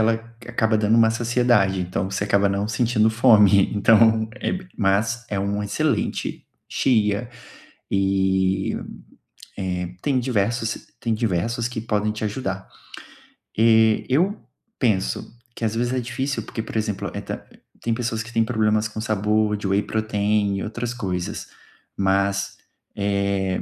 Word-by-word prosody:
ela 110 Hz, +1 st, +4 dB, 0.3 s
acaba 110 Hz, 0 st, +1 dB
dando 110 Hz, +1 st, +3 dB
uma 115 Hz, -1 st, +5 dB
saciedade, 115 Hz, -5 st, +2 dB
então 90 Hz, +2 st, -2 dB
você 100 Hz, +1 st, -1 dB
acaba 100 Hz, -1 st, +3 dB
não 100 Hz, +1 st, -1 dB
sentindo 115 Hz, -2 st, +2 dB
fome, 105 Hz, -4 st, +5 dB
então 110 Hz, +1 st, +4 dB
é -, -, -2 dB
b 185 Hz, 0 st, -5 dB
mas 110 Hz, +4 st, +1 dB
é 100 Hz, -, -1 dB
uma 100 Hz, +1 st, -1 dB
excelente 100 Hz, -, -1 dB, 0.2 s
chia. 110 Hz, -2 st, +1 dB, 0.7 s
E, 95 Hz, -1 st, +1 dB, 1.0 s
eh, 90 Hz, 0 st, -3 dB
tem 135 Hz, -3 st, +1 dB
diversos 115 Hz, -2 st, -1 dB
tem 115 Hz, -1 st, -1 dB
diversos 115 Hz, +2 st, -1 dB
que 120 Hz, -3 st, -5 dB
podem 105 Hz, -1 st, 0 dB
te 110 Hz, +1 st, -6 dB
ajudar. 95 Hz, -4 st, -3 dB, 0.9 s
Eh, 110 Hz, -1 st, +4 dB
eu 180 Hz, +11 st, +1 dB, 0.4 s
penso 105 Hz, -, 0 dB, 0.2 s
que, 115 Hz, -, -3 dB
às 110 Hz, 0 st, -1 dB
vezes, 120 Hz, +2 st, 0 dB
é 130 Hz, -, +1 dB
difícil, 130 Hz, +3 st, -3 dB
porque, 110 Hz, -, -5 dB
por 115 Hz, -, -5 dB
exemplo, 105 Hz, -2 st, -2 dB
e -, -, -4 dB
ta -, -, -6 dB, 0.4 s
tem 115 Hz, -, 0 dB
pessoas 115 Hz, -2 st, -2 dB
que 115 Hz, -, -11 dB
têm 115 Hz, -1 st, +3 dB
problemas 110 Hz, -1 st, +1 dB
com 110 Hz, 0 st, -6 dB
sabor 105 Hz, 0 st, +1 dB
de 100 Hz, -1 st, -4 dB
whey 100 Hz, +2 st, +2 dB
protein 105 Hz, -2 st, 0 dB
e -, -, -3 dB
outras 120 Hz, +2 st, -4 dB
coisas. 90 Hz, -7 st, -4 dB, 0.5 s
Mas, 100 Hz, 0 st, +1 dB, 0.4 s
é 100 Hz, -2 st, 0 dB
110 Hz, 145 wpm, -23 LUFS, 100-115 Hz, 1.0 s, uma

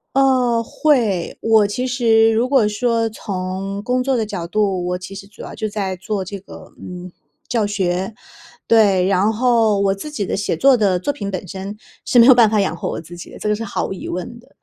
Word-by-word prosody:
呃， 255 Hz, -4 st, +3 dB
会。 230 Hz, -, 0 dB
我 220 Hz, -2 st, +4 dB
其 250 Hz, +6 st, -2 dB
实 225 Hz, -3 st, +3 dB
如 235 Hz, +3 st, +1 dB
果 260 Hz, -7 st, +4 dB
说 230 Hz, +1 st, 0 dB
从 195 Hz, -1 st, -5 dB
工 250 Hz, +3 st, 0 dB
作 265 Hz, -1 st, +1 dB
的 220 Hz, -, 0 dB
角 175 Hz, -5 st, -5 dB
度， 190 Hz, -1 st, 0 dB
我 180 Hz, -, -1 dB
其 185 Hz, +2 st, -9 dB
实 195 Hz, 0 st, -9 dB
主 205 Hz, +1 st, -15 dB
要 -, -, -8 dB
就 215 Hz, -, -3 dB
在 195 Hz, -3 st, -3 dB
做 190 Hz, +1 st, -4 dB
这 200 Hz, +2 st, -6 dB
个， -, -, -13 dB
嗯， 180 Hz, 0 st, -9 dB, 0.4 s
教 230 Hz, -3 st, 0 dB
学。 190 Hz, 0 st, -2 dB, 0.5 s
对， 200 Hz, -5 st, +4 dB
然 195 Hz, +3 st, +2 dB
后 225 Hz, -3 st, +2 dB
我 195 Hz, -1 st, +2 dB
自 200 Hz, +10 st, -7 dB
己 210 Hz, -9 st, -3 dB
的 -, -, -2 dB
写 200 Hz, 0 st, -1 dB
作 275 Hz, -1 st, +5 dB
的 200 Hz, -5 st, +2 dB
作 240 Hz, -, -1 dB
品 205 Hz, -8 st, -5 dB
本 185 Hz, 0 st, -5 dB
身， 195 Hz, +3 st, -7 dB, 0.3 s
是 245 Hz, -, +4 dB
没 235 Hz, -, +8 dB
有 260 Hz, -, +9 dB
办 230 Hz, -3 st, +6 dB
法 215 Hz, -, +1 dB
养 185 Hz, -4 st, 0 dB
活 -, -, -4 dB
我 -, -, -4 dB
自 170 Hz, +2 st, -12 dB
己 -, -, -10 dB
的， -, -, -11 dB
这 -, -, -4 dB
个 210 Hz, -, +2 dB
是 225 Hz, -, -5 dB
毫 210 Hz, -, -3 dB
无 -, -, -5 dB
疑 -, -, -8 dB
问 185 Hz, +7 st, -5 dB
的。 250 Hz, +3 st, -21 dB
210 Hz, 245 characters per minute, -19 LUFS, 190-235 Hz, 0.5 s, 有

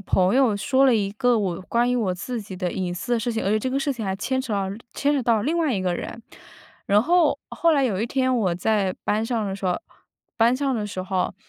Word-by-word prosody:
朋 190 Hz, +1 st, +2 dB
友 255 Hz, -6 st, +3 dB
说 265 Hz, +6 st, +2 dB
了 255 Hz, -, +5 dB
一 200 Hz, -2 st, 0 dB
个 245 Hz, +1 st, +2 dB
我 185 Hz, -4 st, -2 dB
关 235 Hz, +5 st, +1 dB
于 250 Hz, -, +1 dB
我 190 Hz, -6 st, 0 dB
自 235 Hz, +5 st, -5 dB
己 195 Hz, -2 st, -9 dB
的 180 Hz, -1 st, -2 dB
隐 180 Hz, -2 st, -3 dB
私 240 Hz, +7 st, -4 dB
的 235 Hz, -, +2 dB
事 240 Hz, -, -1 dB
情， 225 Hz, -, -2 dB
而 195 Hz, -, +1 dB
且 215 Hz, -, +3 dB
这 260 Hz, -, -2 dB
个 270 Hz, -, 0 dB
事 280 Hz, 0 st, 0 dB
情 230 Hz, -4 st, -5 dB
还 190 Hz, -1 st, -1 dB
牵 260 Hz, +5 st, -1 dB
扯 240 Hz, -4 st, -5 dB
到 195 Hz, -1 st, -1 dB, 0.2 s
牵 285 Hz, +1 st, +1 dB
扯 275 Hz, -, 0 dB
到 225 Hz, -3 st, +2 dB
另 315 Hz, +7 st, 0 dB
外 315 Hz, -5 st, +1 dB
一 190 Hz, -, -1 dB
个 180 Hz, -1 st, 0 dB
人。 230 Hz, -, -6 dB, 0.6 s
然 205 Hz, +2 st, +4 dB
后 330 Hz, -2 st, +3 dB
后 335 Hz, -1 st, +2 dB
来 280 Hz, -3 st, +3 dB
有 205 Hz, -6 st, 0 dB
一 225 Hz, -, 0 dB
天 260 Hz, 0 st, +1 dB
我 195 Hz, -7 st, +1 dB
在 195 Hz, +1 st, 0 dB
班 215 Hz, +2 st, +1 dB
上 225 Hz, -3 st, -1 dB
的 195 Hz, 0 st, -3 dB
时 195 Hz, -, -9 dB
候 180 Hz, -, 0 dB, 0.6 s
班 235 Hz, +2 st, +4 dB
上 270 Hz, -2 st, 0 dB
的 210 Hz, -2 st, -2 dB
时 190 Hz, -2 st, -5 dB
候， 185 Hz, -1 st, -1 dB
225 Hz, 285 characters per minute, -24 LUFS, 195-255 Hz, 0.6 s, 了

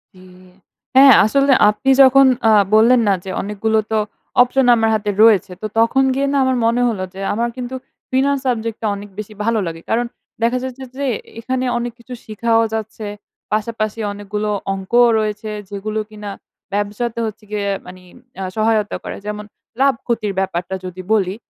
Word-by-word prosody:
জি, -, -, -17 dB, 0.8 s
হ্যাঁ 270 Hz, 0 st, +9 dB
আসলে 275 Hz, +5 st, +2 dB, 0.2 s
আপনি 215 Hz, +6 st, -1 dB
যখন 270 Hz, +1 st, +7 dB, 0.2 s
আ -, -, +6 dB, 0.2 s
বললেন 235 Hz, +3 st, +5 dB
না 200 Hz, -, +4 dB
যে -, -, -6 dB
অনেকগুলো 210 Hz, +2 st, 0 dB
তো 220 Hz, -, +2 dB, 0.4 s
অপশন 250 Hz, +2 st, +3 dB
আমার 225 Hz, -1 st, +2 dB
হাতে 210 Hz, -1 st, -2 dB
রয়েছে। 205 Hz, -4 st, +4 dB
তো -, -, -4 dB
তখন 230 Hz, +4 st, +3 dB
গিয়ে 280 Hz, +1 st, 0 dB
না -, -, +2 dB
আমার 260 Hz, -1 st, +1 dB
মনে 235 Hz, +2 st, +2 dB
হলো 200 Hz, -5 st, -3 dB
যে 195 Hz, -, -8 dB
আমার 235 Hz, +2 st, -1 dB
কিন্তু 250 Hz, +1 st, -5 dB, 0.4 s
ফিনান্স 275 Hz, +2 st, +2 dB
সাবজেক্ট 225 Hz, -2 st, -1 dB
টা 220 Hz, -, -1 dB
অনেক 205 Hz, 0 st, -9 dB
বেশি 215 Hz, 0 st, -7 dB
ভালো 225 Hz, 0 st, +1 dB
লাগে। 165 Hz, 0 st, -6 dB
কারণ 235 Hz, +2 st, +1 dB, 0.4 s
দেখা 235 Hz, +2 st, +2 dB
যাচ্ছে 260 Hz, 0 st, -6 dB
যে 280 Hz, -, -2 dB, 0.3 s
এখানে 255 Hz, +2 st, -2 dB
অনেক 240 Hz, 0 st, -3 dB
কিছু 250 Hz, +2 st, -10 dB
শিখাও 225 Hz, +1 st, +1 dB
যাচ্ছে। 220 Hz, -1 st, -5 dB, 0.5 s
পাশাপাশি 215 Hz, 0 st, -2 dB
অনেকগুলো 210 Hz, +1 st, -4 dB, 0.2 s
অঙ্কও 235 Hz, +6 st, +3 dB
রয়েছে, 215 Hz, 0 st, -3 dB, 0.2 s
যেগুলো 210 Hz, +2 st, -4 dB
কিনা 210 Hz, -1 st, -8 dB, 0.4 s
ব্যবসাতে 210 Hz, +3 st, -2 dB
হচ্ছে 215 Hz, 0 st, -7 dB
গিয়ে 205 Hz, -1 st, -2 dB, 0.2 s
মানে 185 Hz, +1 st, -11 dB, 0.4 s
আ -, -, -2 dB
সহায়তা 215 Hz, -1 st, +1 dB
করে। -, -, -6 dB
যেমন 210 Hz, 0 st, -5 dB, 0.4 s
লাভ 275 Hz, 0 st, +5 dB
ক্ষতির 220 Hz, -4 st, -1 dB
ব্যাপারটা 190 Hz, -1 st, -2 dB
যদি 185 Hz, 0 st, -7 dB
বলি। 195 Hz, -3 st, +1 dB
220 Hz, 170 wpm, -18 LUFS, 205-245 Hz, 0.8 s, হ্যাঁ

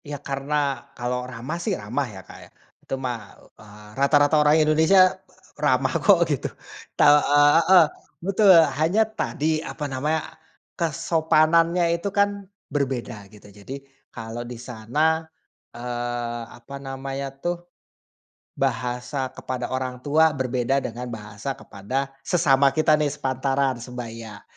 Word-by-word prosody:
Iya 145 Hz, 0 st, -5 dB
karena 140 Hz, +2 st, -2 dB, 0.4 s
kalau 125 Hz, +1 st, -2 dB
ramah 130 Hz, +7 st, -5 dB
sih -, -, 0 dB
ramah 120 Hz, +8 st, -2 dB
ya 100 Hz, -3 st, -10 dB
Kak -, -, -12 dB
ya. -, -, -16 dB, 0.3 s
Itu -, -, -8 dB
mah, 125 Hz, -2 st, -2 dB, 0.4 s
eee, 105 Hz, 0 st, -14 dB
rata-rata 145 Hz, +2 st, +4 dB
orang 150 Hz, +1 st, +5 dB
Indonesia, 160 Hz, +4 st, +4 dB, 0.6 s
ramah 130 Hz, -2 st, +2 dB
kok 175 Hz, +1 st, +5 dB
gitu. 145 Hz, -5 st, -2 dB, 0.5 s
Tau 145 Hz, 0 st, +7 dB
eee, 145 Hz, +1 st, +5 dB, 0.2 s
heeh, 185 Hz, -2 st, +8 dB, 0.4 s
betul 200 Hz, +1 st, +3 dB, 0.3 s
hanya 170 Hz, +8 st, +3 dB
tadi 160 Hz, -8 st, -2 dB
apa 150 Hz, -1 st, -6 dB
namanya, 145 Hz, +3 st, -1 dB, 0.5 s
kesopanannya 165 Hz, +1 st, +2 dB, 0.2 s
itu 200 Hz, -, -2 dB
kan 200 Hz, 0 st, +5 dB, 0.4 s
berbeda 125 Hz, -7 st, -3 dB
gitu 105 Hz, 0 st, -17 dB
jadi, 105 Hz, +6 st, -10 dB, 0.4 s
kalau 115 Hz, +1 st, -6 dB
di 120 Hz, 0 st, -7 dB
sana, 145 Hz, +8 st, -1 dB, 0.5 s
eee, 120 Hz, -1 st, -4 dB
apa 120 Hz, +4 st, -11 dB
namanya 135 Hz, 0 st, -5 dB
tuh, 175 Hz, +3 st, -4 dB, 0.9 s
bahasa 125 Hz, 0 st, -2 dB
kepada 125 Hz, -2 st, -5 dB
orang 130 Hz, -1 st, -4 dB
tua 155 Hz, +3 st, +3 dB
berbeda 130 Hz, 0 st, 0 dB
dengan 120 Hz, +2 st, -5 dB
bahasa 110 Hz, +2 st, -6 dB
kepada 130 Hz, +7 st, -4 dB, 0.2 s
sesama 140 Hz, -5 st, +3 dB
kita 155 Hz, -1 st, +3 dB
nih 150 Hz, -, +1 dB
sepantaran 135 Hz, -1 st, -1 dB
sebaya, 115 Hz, -3 st, -8 dB
135 Hz, 125 wpm, -24 LUFS, 120-155 Hz, 0.9 s, heeh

